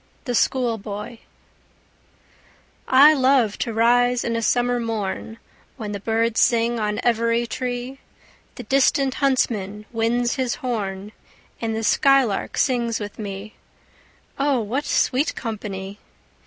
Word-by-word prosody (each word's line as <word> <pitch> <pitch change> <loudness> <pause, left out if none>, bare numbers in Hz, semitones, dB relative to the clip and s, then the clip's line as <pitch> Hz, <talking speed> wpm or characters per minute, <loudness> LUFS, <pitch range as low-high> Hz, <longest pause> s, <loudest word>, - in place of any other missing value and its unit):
THE 245 - -2
SCHOOLBOY 225 -3 -1 1.7
I 280 +4 +7
love 260 -6 +2
to 235 - -2
rise 245 +2 +3
in 230 - -2
a 230 - -1
summer 245 +1 +1
morn, 225 -1 -4 0.4
When 215 -4 -5
the 200 - -4
birds 225 +2 0
sing 235 0 +2
on 210 -1 -1
every 230 0 +1
tree; 250 +3 -4 0.6
The 250 - -8
distant 270 +2 +2
huntsman 210 -7 -1
winds 240 +2 0
his 255 -2 -1
horn, 205 -5 -4 0.5
And 225 -1 -2
the 225 - -3
skylark 265 -2 +2
sings 235 -4 +1
with 205 0 -7
me: 200 0 -6 0.9
O 275 -2 +2
what 240 +7 -2
sweet 275 +4 +1
company! 200 -3 -6
230 Hz, 120 wpm, -22 LUFS, 215-250 Hz, 1.7 s, I